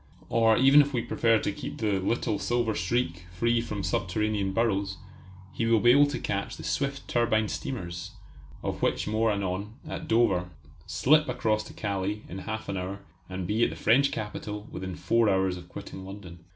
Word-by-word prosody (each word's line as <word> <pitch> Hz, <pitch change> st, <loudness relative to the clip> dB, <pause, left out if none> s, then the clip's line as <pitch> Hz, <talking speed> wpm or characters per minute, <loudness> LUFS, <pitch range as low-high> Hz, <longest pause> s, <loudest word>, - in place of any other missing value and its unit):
Or 115 Hz, -1 st, +4 dB
even 135 Hz, +3 st, +7 dB
if 145 Hz, 0 st, -1 dB
we 120 Hz, -2 st, 0 dB
prefer 115 Hz, -1 st, +3 dB
to 105 Hz, -, -1 dB
keep -, -, -7 dB
the 105 Hz, -3 st, +1 dB
"little 105 Hz, +1 st, 0 dB
silver 120 Hz, -2 st, 0 dB
streak" 90 Hz, -2 st, -1 dB
free 115 Hz, +6 st, +1 dB
from 105 Hz, -4 st, -4 dB
subterranean 100 Hz, +1 st, 0 dB
burrows, 100 Hz, -3 st, 0 dB, 0.6 s
he 115 Hz, -, -1 dB
will 115 Hz, -1 st, +4 dB
be 120 Hz, +3 st, +6 dB
able 145 Hz, +3 st, +6 dB
to 145 Hz, -, -3 dB
catch 100 Hz, 0 st, -3 dB
the -, -, -9 dB
swift 140 Hz, 0 st, -2 dB
turbine 115 Hz, -2 st, +2 dB
steamers 90 Hz, -9 st, -5 dB, 0.5 s
of -, -, -3 dB
which -, -, 0 dB
more 110 Hz, +1 st, +2 dB
anon 100 Hz, +1 st, -3 dB
at -, -, -5 dB
Dover, 95 Hz, -6 st, +2 dB, 0.4 s
slip 155 Hz, +3 st, +3 dB
across 110 Hz, -1 st, 0 dB
to -, -, -11 dB
Calais 100 Hz, 0 st, -2 dB
in 95 Hz, -, -6 dB
half 110 Hz, +3 st, -5 dB
an 95 Hz, -, -2 dB
hour, 95 Hz, +2 st, -4 dB, 0.3 s
and 95 Hz, -1 st, -4 dB
be 110 Hz, +6 st, +1 dB
at -, -, +3 dB
the -, -, -7 dB
French 135 Hz, +6 st, +3 dB
capital 105 Hz, -1 st, -5 dB
within 95 Hz, -1 st, -5 dB
four 115 Hz, +7 st, +2 dB
hours 95 Hz, -1 st, +2 dB
of 90 Hz, -1 st, -11 dB
quitting 95 Hz, -, -8 dB
London. 95 Hz, -3 st, -9 dB
105 Hz, 185 wpm, -28 LUFS, 95-115 Hz, 0.6 s, even